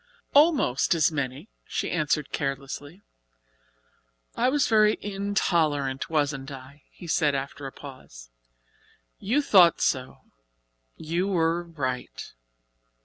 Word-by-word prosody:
"Almost 280 - +4
as 160 -1 +3
many," 140 +3 -4 0.2
she - - -3
answered 150 -3 -1
carelessly. 140 +6 -5 1.3
"I 245 +2 +2
was 285 +1 +2
very 215 -1 +4
intolerant, 170 -9 -1
wasn't 145 -3 -1
I?" 135 +1 -11
he - - -13
said 150 -3 +1
after 140 +1 -5
a - - -8
pause. - - -12 0.9
"You 255 +9 +1
thought 180 - +6
so 130 -1 -1 0.7
you 170 +4 -2
were 170 -3 +1
right. 140 -7 -5
155 Hz, 105 wpm, -26 LUFS, 135-190 Hz, 1.3 s, thought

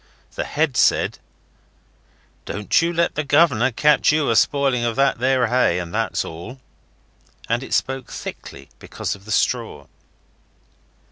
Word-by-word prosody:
The - - -4
head 150 -4 -1
said - - +2 1.3
'Don't 105 +9 0
you 170 +1 0
let 170 0 0
the 150 - -2
governor 140 -4 +3
catch 150 +6 +3
you 150 -4 +1
a - - +1
spoiling 135 -1 +2
of 115 -1 -1
that 135 -3 +1
there 130 0 +2
hay, 115 -7 +2
that's 95 +4 -2
all.' 90 +11 -9 0.9
And 115 +2 0
it 135 - -2
spoke 130 -1 -2
thickly - - -9
because - - -5
of 100 0 -13
the 110 - -8
straw. - - -1
130 Hz, 140 wpm, -21 LUFS, 115-145 Hz, 1.3 s, governor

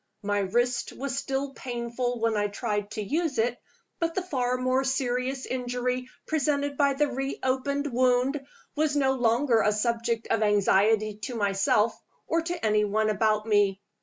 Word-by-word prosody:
My 205 0 0
wrist 240 +5 0
was 270 -1 -4
still 275 0 -2
painful 245 -1 -3
when 230 -1 +2
I 205 0 +1
tried 205 -1 -3
to 215 - -3
use 310 - -1
it; 235 +2 0 0.4
but 335 -1 -1
the 375 - -1
far 255 -7 -1
more 255 +1 +1
serious 265 0 -1
injury 250 0 -2 0.2
presented 285 -2 0
by 280 -1 +2
the 295 +2 +3
re 270 0 -3
opened 275 +2 0
wound 255 +3 +2 0.3
was 305 -1 +1
no 270 -2 +3
longer 240 -1 +2
a 210 - +3
subject 230 +1 -1
of 225 - +2
anxiety 210 +1 +3
to 245 - -5
myself 205 +1 +2 0.3
or 335 +1 +1
to 340 -4 -4
any 210 -1 +3
one 215 +1 +1
about 215 0 +1
me. 205 -3 +2
245 Hz, 165 wpm, -27 LUFS, 215-270 Hz, 0.4 s, the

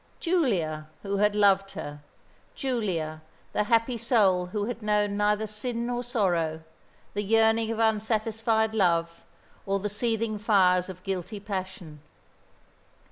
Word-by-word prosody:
Giulia, 190 - 0 0.2
who 200 0 -2
had 210 +1 +2
loved 195 -1 +3
her, 145 0 -7 0.5
Giulia, 185 - -2 0.3
the 210 - +1
happy 230 +2 +2
soul 200 -6 +3
who 205 +2 -2
had 235 0 -5
known 210 -1 +1
neither 210 +1 +1
sin 230 +3 -4
nor 245 0 -2
sorrow, 175 -9 0 0.5
the 205 - -1
yearning 225 +1 +3
of 225 - -2
unsatisfied 220 0 +1
love, 170 -5 +1 0.4
or 195 0 +1
the 210 +2 -2
seething 225 0 -1
fires 185 -4 +3
of 185 -1 -9
guilty 195 +2 -4
passion. 185 -6 -6
210 Hz, 130 wpm, -27 LUFS, 185-225 Hz, 0.5 s, loved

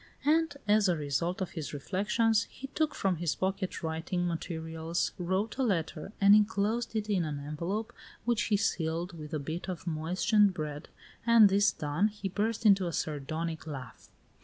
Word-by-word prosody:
And, 315 -1 +2
as 205 -1 +4
a 175 - +3
result 155 +5 -1
of 180 -2 -2
his 155 -3 -5
reflections, 210 +8 +1
he 270 - -9
took 310 -1 0
from 190 -3 0
his 170 -1 -1
pocket 190 -1 -2
writing 165 +2 -1
materials, 165 0 -2
wrote 190 +7 -1
a - - +3
letter, 180 -5 -1
and 200 0 +7
inclosed 215 +2 +2
it 215 -1 -1
in 195 -5 +1
an 150 -2 -3
envelope, 170 +10 -4 0.3
which 240 -1 +1
he 210 - +2
sealed 170 -2 -1
with 150 -2 -8
a 155 - -1
bit 160 +6 -5
of 185 0 -5
moistened 180 +5 +2
bread, 150 0 -5 0.3
and 230 -3 +7
this 200 +1 +4
done, 150 +7 0
he 210 -2 -5
burst 215 +4 -1
into 195 -3 +5
a - - -2
sardonic 160 +3 -3
laugh. 135 -6 -8
185 Hz, 170 wpm, -30 LUFS, 160-210 Hz, 0.3 s, and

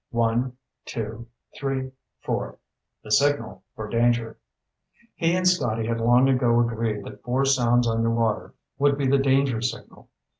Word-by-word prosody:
One, 120 +1 0 0.3
two, 115 +1 -6 0.3
three, 135 -1 -3 0.3
four - - -3 0.5
the 105 - -9
signal 115 -5 +1
for 110 - -6
danger! 115 0 0 0.7
He 165 +1 +1
and 185 0 +1
Scotty 115 -12 +1
had 115 0 -2
long 120 +3 +4
ago 125 -3 +3
agreed 115 -3 -1
that - - -11
four 130 +3 0
sounds 120 -3 +3
underwater 115 -1 0 0.2
would 140 0 +3
be 140 - -1
the 135 +1 +3
danger 135 -3 +2
signal. 120 0 -6
120 Hz, 140 wpm, -24 LUFS, 115-135 Hz, 0.7 s, long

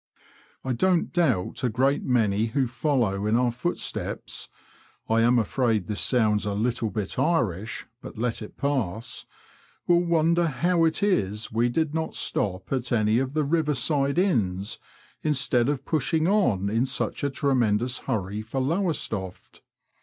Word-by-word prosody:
I 130 - -1
don't 175 +7 +1
doubt 130 - 0
a 125 - +2
great 135 +5 +1
many 110 -4 +1
who 135 +3 0
follow 120 -6 0
in 110 - +2
our 125 0 +2
footsteps 125 +9 -4 0.6
(I 115 0 +3
am 120 +2 +4
afraid 115 -2 +1
this 105 +3 -2
sounds 110 -5 +2
a 100 -1 -2
little 115 +1 0
bit 105 -3 -4
Irish 115 - 0
— 120 - -46
^but - - -8
let 115 0 -1
it 105 - -9
pass) 120 -7 -2 0.6
will 175 0 +4
wonder 170 0 +2
how 165 +4 +2
it 160 +4 0
is 105 - 0
we 115 +2 +2
did 155 +4 0
not 160 0 -2
stop 95 +3 -2
at 125 -2 -2
any 110 -1 +3
of 135 +1 -2
the 155 - +2
river 150 0 +1
side 140 +3 +1
inns, 110 - 0 0.4
instead 130 -4 +2
of 140 -2 -2
pushing 160 +1 +1
on 150 - +2
in 115 +5 +1
such 135 - -2
a 140 - +2
tremendous 125 -3 +1
hurry 105 -4 -3
for 115 +5 -4
Lowestoft. 135 - -2
125 Hz, 155 wpm, -26 LUFS, 110-150 Hz, 0.6 s, am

